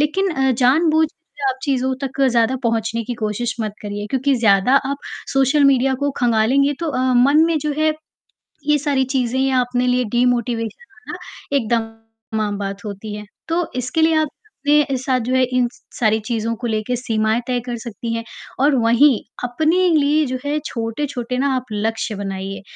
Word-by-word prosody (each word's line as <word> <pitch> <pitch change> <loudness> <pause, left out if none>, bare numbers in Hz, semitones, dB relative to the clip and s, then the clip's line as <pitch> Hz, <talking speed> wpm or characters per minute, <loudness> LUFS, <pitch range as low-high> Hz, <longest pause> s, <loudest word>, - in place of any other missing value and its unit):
लेकिन 370 +6 +1
अ, 270 -4 +1
जानबूझकर 310 +6 +3 0.3
आप 260 - -2
चीज़ों 260 -2 0
तक 270 0 -4
ज़्यादा 235 +2 +2
पहुँचने 230 0 0
की 245 +1 -4
कोशिश 215 +2 -2
मत 215 -1 -2
करिए, 205 0 -5
क्योंकि 270 +1 +1
ज़्यादा 220 +2 +4 0.2
आप 280 - -1 0.4
सोशल 270 +2 +3
मीडिया 270 -1 +4
को 285 - +1
खंगालेंगे 245 +4 +3
तो 330 -3 -1
अ, 255 - -2 0.2
मन 280 +6 +5
में 330 -1 +1
जो 300 0 -2
है, 310 0 +3 0.8
ये 300 0 +4
सारी 280 -2 +1
चीज़ें 255 0 0
या 265 -1 +2
अपने 245 0 -1
लिए 250 0 +2
डिमोटिवेशन 240 - 0
होना 435 - -9 0.4
एकदम 225 -2 -1 0.5
आम 205 -1 -2
बात 200 0 -5
होती 205 +1 -6
है। 210 - -8 0.2
तो 335 0 0
इसके 250 +5 -1
लिए 320 0 +4
आप 310 -1 +2 0.4
अपने 295 -2 +3
साथ 260 0 0
जो 250 +3 -2
है 260 - +4
इन 250 -1 +3
स - - -21 0.2
सारी 220 -1 +3
चीज़ों 230 -1 -1
को 240 - -1
लेके 220 +3 -1
सीमाएँ 220 -1 0
तय 250 -1 0
कर 245 - -3
सकती 230 0 -5
हैं 230 0 -3 0.4
और 285 0 +4
वहीं 240 +1 +4 0.2
अपने 315 +9 +2
लिए 300 +1 +3
जो 255 -1 -3
है 290 +1 0
छोटे-छोटे 245 +1 -3
ना 275 - +1
आप 255 0 -3
लक्ष्य 220 0 -2
बनाइए, 195 0 -5
250 Hz, 180 wpm, -20 LUFS, 225-280 Hz, 0.8 s, मन